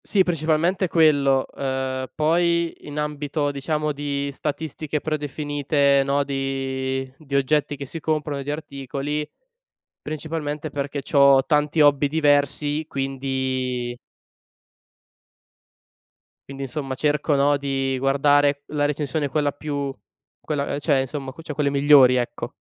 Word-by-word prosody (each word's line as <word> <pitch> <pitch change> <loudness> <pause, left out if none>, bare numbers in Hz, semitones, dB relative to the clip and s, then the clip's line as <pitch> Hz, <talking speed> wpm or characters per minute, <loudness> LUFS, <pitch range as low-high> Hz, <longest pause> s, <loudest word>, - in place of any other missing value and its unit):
Sì 195 -3 +2
principalmente 170 +2 +1
quello, 145 -5 +3
ehm, 130 -1 -2
poi 170 +2 +1
in 145 0 -6
ambito 150 0 -2
diciamo 150 +2 -1
di 140 0 -3
statistiche 150 +1 -4
predefinite 145 -2 +1
no, 140 +1 +1
di 135 -1 -3
di 140 -3 -8
oggetti 145 +2 +1
che 140 - -6
si 165 +5 -7
comprano, 150 -2 -2
di 145 - -5
articoli, 145 0 -4 0.7
principalmente, 155 0 -4
perché 140 0 -3
c'ho 140 -2 +5
tanti 150 +1 +1
hobby 145 -1 +5
diversi 145 0 +1
quindi 130 -2 -2 2.5
quindi 135 0 -6
insomma 135 0 -4
cerco 150 +1 +1
no, 140 +1 +3
di 135 -1 -1
guardare 140 +1 +3
la 145 -1 0
recensione 145 0 -2
quella 145 +1 0
più 140 -2 -4 0.5
quella 145 -1 -2
cioè 145 -2 +2
insomma, 135 0 -4
cioè 155 - -6
quelle 145 0 0
migliori, 140 -2 +6
ecco. 120 -1 -3
145 Hz, 115 wpm, -23 LUFS, 135-150 Hz, 2.5 s, migliori